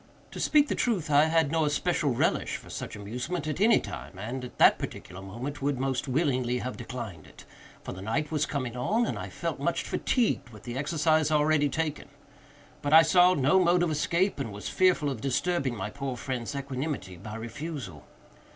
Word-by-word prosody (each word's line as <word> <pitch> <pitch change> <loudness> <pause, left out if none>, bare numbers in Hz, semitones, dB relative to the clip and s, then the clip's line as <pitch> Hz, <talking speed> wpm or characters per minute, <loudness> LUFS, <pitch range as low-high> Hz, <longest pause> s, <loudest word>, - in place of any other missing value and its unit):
To - - -7
speak 295 -1 +4
the - - 0
truth, 185 -10 0
I 145 +1 +6
had 160 -2 +2
no 165 -1 +2
especial 150 +1 +1
relish - - +1
for - - -13
such - - -6
amusement 125 - -4
at 155 +4 -3
any 225 +2 +6
time, 95 - -8
and, 120 +6 -5
at 125 - -11
that - - +6
particular 95 +2 -7
moment, 120 +10 -6
would 140 -1 0
most 135 +1 -1
willingly 130 -3 +1
have 125 +1 -4
declined 115 -9 -7
it; - - -15 0.4
for - - -6
the 95 - -9
night 115 +9 -2
was 155 -2 +1
coming 130 -5 -3
on, 215 - +1
and - - -3
I - - -6
felt - - -4
much - - 0
fatigued 235 - 0
with 110 -3 -14
the 120 0 -6
exercise 155 +2 +2
already 150 -1 +3
taken; 155 0 -2 0.7
but 145 0 0
I 160 +1 +10
saw 180 +3 +5
no 150 +7 +4
mode 175 0 +3
of 170 - +1
escape, 170 +4 +1
and 130 -6 -3
was 105 +1 -6
fearful 180 -6 +3
of 120 -5 -6
disturbing 140 0 0
my 105 0 -4
poor 135 -1 -4
friend's 130 +1 -4
equanimity 135 - -4
by 105 +4 -8
a - - -5
refusal. 115 - -7
140 Hz, 195 wpm, -28 LUFS, 120-160 Hz, 0.7 s, I